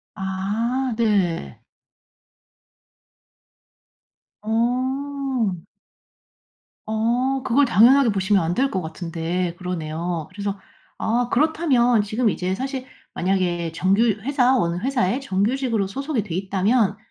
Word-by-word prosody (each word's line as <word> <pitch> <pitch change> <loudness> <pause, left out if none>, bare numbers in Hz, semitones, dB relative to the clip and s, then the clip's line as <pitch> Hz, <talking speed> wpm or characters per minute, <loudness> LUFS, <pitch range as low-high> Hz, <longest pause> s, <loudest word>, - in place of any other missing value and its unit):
아 215 +7 -2
네. 200 -7 0 2.8
어. 255 -1 -1 1.3
어 240 +5 0
그걸 270 +3 +3
당연하게 245 +4 +5
보시면 195 -1 +2
안 165 +2 -1
될 270 +7 +1
것 190 - -1
같은데 170 +1 -3
그러네요. 170 -2 -4
그래서 200 0 -4 0.4
아 240 +2 0
그렇다면 260 -5 +3
지금 220 +3 0
이제 185 -1 -2
사실 265 +3 -4 0.3
만약에 175 -3 0
정규 190 +6 +2 0.2
회사, 260 +1 +2
어느 170 -6 0
회사에 245 +1 0
정규직으로 230 -1 0
소속이 275 +2 -2
돼 175 -5 -5
있다면 195 +3 +1
215 Hz, 215 characters per minute, -22 LUFS, 185-255 Hz, 2.8 s, 당연하게